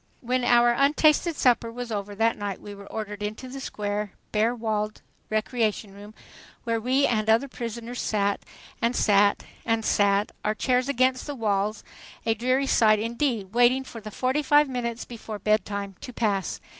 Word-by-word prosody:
When 250 +1 0
our 240 0 +5
untasted 300 +5 +3
supper 240 -4 +2
was 245 0 -6
over 205 -1 -4
that 225 +2 +2
night 200 -2 -4
we 205 - -9
were 200 0 -12
ordered 210 -2 -5
into 215 +5 -5
the 270 +2 -7
square, 205 -4 -3 0.2
bare 225 +3 +2
walled 215 -2 -2 0.3
"recreation" 215 -2 -1
room, 205 +2 -12 0.5
where 230 -1 -1
we 260 +4 +2
and 215 -2 0
the 220 - +6
other 240 +5 +1
prisoners 235 -1 -6
sat, 200 -2 0 0.4
and 235 +1 +1
sat, 205 -1 +3 0.2
and 225 -1 0
sat, 200 0 +2
our 215 +1 0
chairs 255 +3 +1
against 255 0 +1
the 290 - -4
walls, 210 -2 -1 0.4
a 225 - +3
dreary 255 +5 +1
sight 215 -5 +4
indeed, 230 -2 -2
waiting 245 +2 +4
for 235 -3 -10
the 215 - -7
fortyfive 290 +5 +2
minutes 240 -2 -3
before 225 -2 -7
bedtime 200 -1 -1
to 250 - -7
pass. 205 -5 -1
225 Hz, 170 wpm, -26 LUFS, 210-250 Hz, 0.5 s, the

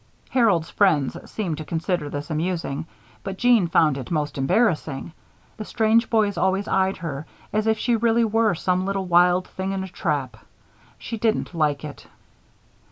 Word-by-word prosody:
Harold's 215 -11 +2
friends 155 -10 +2
seemed 175 -8 -3
to - - -4
consider 165 0 -2
this 145 +2 -6
amusing; 165 -2 -2 0.4
but 195 -1 -5
Jeanne 240 -6 +4
found 155 -4 +3
it 130 - -7
most 150 -3 -1
embarrassing. 155 - 0 0.5
The 215 - -5
strange 225 +2 +2
boys 210 -4 +1
always 190 +1 +1
eyed 190 0 +1
her 155 -4 -6 0.3
as 215 +1 0
if 220 0 +2
she 240 +2 +1
really 230 0 +2
were 220 -2 +2
some 180 +2 0
little 195 -1 -1
wild 180 +1 +3
thing 190 +1 -4
in 190 -1 -2
a - - -6
trap. 145 -9 -3 0.6
She 230 -2 -6
didn't 220 -4 0
like 150 -3 0
it. 145 - -10
185 Hz, 165 wpm, -23 LUFS, 155-215 Hz, 0.6 s, Jeanne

